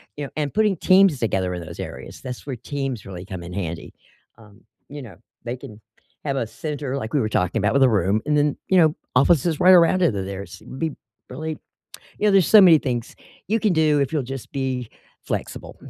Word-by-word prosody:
you 145 - -5
know, 140 - -7
and 145 -2 -2
putting 210 -3 +2
teams 185 -5 +4
together 95 -5 -1
in 90 - -5
those 80 - -10
areas. - - -8
That's 125 +3 -8
where 135 - -3
teams 135 -1 -5
really 90 -2 -8
come 95 -3 -7
in 85 - -9
handy. 85 -3 -5 0.4
Um, 105 -3 -19 0.2
you 145 0 -8
know, 115 -7 -12 0.3
they 120 +1 -4
can 110 -3 -12 0.4
have 140 -2 -2
a 115 - -1
center- 145 - -5
like 110 -4 -5
we 145 - +3
were 110 - 0
talking 95 +1 0
about- 105 +4 +1
with 140 -1 +4
a 130 - +6
room 100 0 +1
and 150 0 +1
then, 145 -1 +2
you 190 - +4
know, 160 -3 +4 0.2
offices 155 +3 +3
right 185 - +6
around 180 +1 +5
it. 170 -10 +3
Th 95 -1 -3
there's 100 0 -8
it'd 130 - -10
be 160 -1 -1 0.4
really 155 +4 -5 0.6
you 210 - +1
know, - - +5
there's 195 -3 +4
so 215 -2 +8
many 170 -4 +7
things 120 -4 -4 0.3
you 225 +1 +1
can 210 -6 +2
do 155 -2 +3
if 140 +1 -1
you'll 150 - +1
just 135 0 -7
be 130 -3 -3 0.4
flexible. - - -5
135 Hz, 225 wpm, -22 LUFS, 110-155 Hz, 0.6 s, so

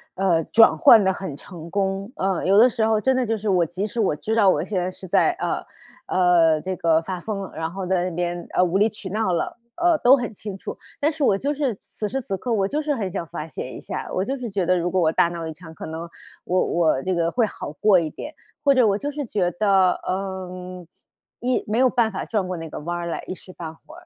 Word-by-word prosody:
呃， 175 -4 +2
转 225 0 +5
换 240 -9 +7
得 190 - +3
很 185 -6 -6
成 170 +1 -11
功。 195 +3 -2
呃， 190 -1 -1
有 195 +2 +4
的 240 +4 +8
时 230 -3 0
候 220 -1 +2
真 265 +4 +2
的 255 -1 +1
就 225 -1 -1
是 210 0 -3
我 180 -3 +3
即 180 +5 -3
使 235 - -5
我 195 -8 +2
知 220 +9 -2
道 205 -4 +5
我 - - +2
现 205 - -3
在 180 - -1
是 185 - -11
在， - - +3
呃， - - -3 0.4
呃， 170 -4 +4
这 185 0 -3
个 165 -1 +3
发 180 +2 -5
疯 200 +1 -4
了， 190 - -7
然 160 +1 -3
后 190 0 -5
在 180 0 0
那 170 - -8
边， 175 0 -2
呃， - - +3
无 180 +1 +1
理 210 +3 +4
取 205 -3 -8
闹 210 -1 0
了， 170 - -2 0.2
呃， 345 -2 +3
都 250 +3 +7
很 240 -3 -4
清 205 -1 -7
楚。 - - -7 0.2
但 300 +3 +2
是 300 -2 -3
我 195 -6 +4
就 285 +7 -1
是 280 -5 -1
此 210 - -5
时 270 +4 -2
此 195 -5 -3
刻 245 - -4
我 195 -4 +2
就 300 +8 -1
是 295 -1 0
很 205 -6 -2
想 175 -3 -3
发 155 +1 -6
泄 130 - -6
一 - - -8
下。 - - -6
我 185 - 0
就 270 +5 -2
是 245 -3 -5
觉 195 -2 -1
得 185 +1 +3
如 175 0 -1
果 185 - +2
我 160 -1 +3
大 170 - +3
闹 170 -1 -5
一 160 - -5
场， 160 0 -13
可 - - -8
能 165 +2 -6 0.3
我 185 +1 +1
我 160 -6 +1
这 185 -1 0
个 170 0 +1
会 240 -2 +2
好 205 - -6
过 185 +3 +4
一 160 - -2
点， 295 - -8 0.3
或 280 -1 +5
者 255 -3 +5
我 200 0 +2
就 285 - -3
是 290 -1 -4
觉 190 -6 0
得， 190 -1 +3
嗯， 185 -1 -5 0.5
一 250 +1 0
没 215 - -1
有 260 - +5
办 235 -3 +1
法 190 - -4
转 210 -4 -1
过 185 - -3
那 165 -1 -7
个 - - -6
弯 175 +2 -3
儿 170 - -4
来， 170 - -4
一 - - -3
时 185 0 -13
半 160 -3 -7
会 310 - -16
儿， 355 +1 -15
190 Hz, 290 characters per minute, -23 LUFS, 175-220 Hz, 0.5 s, 的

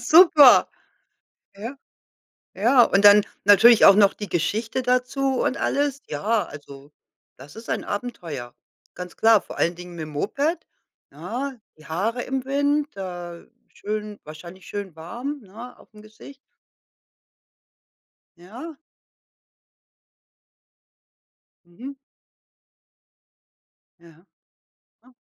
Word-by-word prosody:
Super. 305 0 +6 0.9
Ja. 230 +7 -8 0.8
Ja. 240 +6 +4
Und 200 -2 +2
dann 205 0 +8 0.2
natürlich 205 +3 +6
auch 195 - +8
noch 200 -1 +4
die 205 - -8
Geschichte 215 +9 -2
dazu 255 +1 -1
und 265 - -1
alles. 280 -1 -1
Ja, 210 +9 -1
also, 140 0 -13 0.5
das 140 +3 -14
ist 225 +1 -11
ein 220 - -2
Abenteuer, 165 - -6 0.4
ganz 180 -1 -9
klar. 225 -2 +4
Vor - - -12
allen 170 +1 0
Dingen 175 0 -11
mit 160 -2 -6
'm - - -11
Moped, 280 - -2 0.5
ja, 270 +3 -6 0.2
die 155 - -18
Haare 220 +9 -3
im 265 0 -4
Wind, 285 +2 0
da 175 -3 -8 0.3
schön 210 0 -6
wahrscheinlich 170 +4 -12
schön 200 -5 -7
warm, 240 - -7
ne? 225 +4 -12
Aufm 210 -1 -18
Gesicht? 220 +6 -15 2.0
Ja. 245 - -11 2.9
Mhm. 240 +11 -10 2.1
Ja. 170 +1 -21 0.8
Ja. 255 +1 -23
215 Hz, 105 wpm, -23 LUFS, 175-255 Hz, 2.9 s, dann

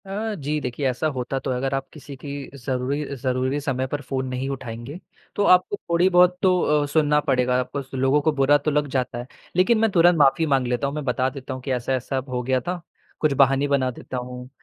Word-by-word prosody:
अ, 210 +3 -3
जी 150 -2 -2
देखिए 130 +2 -2
ऐसा 130 +5 -1
होता 130 +1 -2
तो 135 - -3
है, 125 - -1
अगर 135 +2 -2
आप 135 0 -3
किसी 145 -2 -10
की 145 - -6 0.3
ज़रूरी 130 +2 -2
ज़रूरी 130 +2 -1
समय 130 -2 -1
पर 145 +2 -4
फ़ोन 130 -1 -3
नहीं 130 +1 -3
उठाएँगे, 130 +3 -6 0.4
तो 205 - +1
आपको 185 +1 +4
थोड़ी-बहुत 180 +1 +4
तो 185 -1 +3 0.2
अ, - - -1
सुनना 150 -2 +3
पड़ेगा, 125 -1 +2
आपको 130 +3 -3
स 135 0 -16
लोगों 135 +3 +2
को 155 - +2
बुरा 145 0 +4
तो 145 +2 -1
लग 150 0 +1
जाता 125 -2 -2
है। 120 - -7 0.3
लेकिन 190 +6 +4
मैं 225 0 +3
तुरंत 175 -1 +5
माफ़ी 145 +3 +4
माँग 135 -4 +1
लेता 125 +2 0
हूँ, 140 - -4
मैं 150 - -3
बता 130 0 +1
देता 135 0 -7
हूँ 130 - -7
कि 135 - -2
ऐसा-ऐसा 130 +1 -1
हो 125 -1 -2
गया 130 +1 +1
था, 175 +5 -4 0.4
कुछ 155 -3 +2
बहाने 135 +1 +3
बना 135 -2 +1
देता 130 +1 -7
हूँ, 125 0 -7
135 Hz, 225 wpm, -23 LUFS, 130-150 Hz, 0.4 s, तुरंत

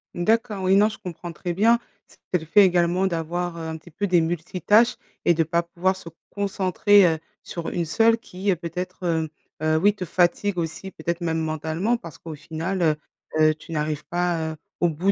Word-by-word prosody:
D'accord, 215 +2 +1
oui, 190 +1 +4
non, 210 +1 +6
je 220 - -6
comprends 175 -1 -7
très 175 +2 -4
bien. 230 +6 +4 0.3
C'est 180 - -4
le 160 - -10
fait 205 +5 +6
également 180 +1 +3
d'avoir, 170 0 -2
heu, 160 -1 -5
un 160 - -4
petit 170 +1 -16
peu 200 +5 -2
des 175 -2 +4
multitâches 180 +7 +2 0.3
et 170 - +6
de 165 0 +2
pas 170 +2 +1
pouvoir 180 +2 -1
se 170 - -12 0.2
concentrer, 200 0 +3
heu, 160 -2 +2 0.2
sur 170 -1 -6
une 170 - -1
seule 225 +8 +4
qui, 195 -2 -5
heu, 185 - +4
peut-être, 180 +2 -6
heu, 160 -2 0 0.3
heu, 155 0 +2
oui 205 +5 +4
te 185 -3 -5
fatigue 180 +3 +1
aussi, 170 +3 -4
peut-être 170 +2 -3
même 165 -1 0
mentalement, 160 +8 -1
parce 165 -7 -11
qu'au 165 -2 -8
final, 165 +5 -4
heu, 155 -2 +3 0.5
heu, 155 0 +6
tu 165 +1 -10
n'arrives 150 -1 -2
pas, 175 -2 -1
heu, - - -10 0.2
au 175 - +4
bout 175 +6 +1
175 Hz, 205 wpm, -24 LUFS, 160-190 Hz, 0.5 s, non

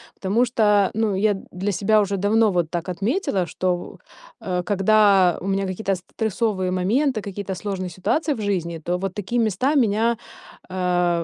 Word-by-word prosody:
Потому 205 +6 +1
что, 210 -4 +2
ну, 220 -2 0
я 205 +1 +2 0.2
для 195 +3 -2
себя 210 +3 +3
уже 200 -1 -1
давно 210 +3 +3
вот 175 -3 0
так 175 +1 -3
отметила, 195 - -1
что, 180 +2 -1
в, 175 - -9 0.4
э, 180 -1 -2
когда 200 -2 +4
у 190 - -5
меня 195 0 0
какие-то 195 +1 -2
стрессовые 195 0 -2
моменты, 220 +7 +1
какие-то 200 -1 -5
сложные 185 -1 -4
ситуации 295 - -1
в 220 - -6
жизни, 175 -5 -2
то 175 +3 -2
вот 190 0 -4
такие 210 +5 -2
места 230 +7 +1
меня, 230 -2 +2 0.5
а 180 -2 0
195 Hz, 165 wpm, -22 LUFS, 180-215 Hz, 0.5 s, когда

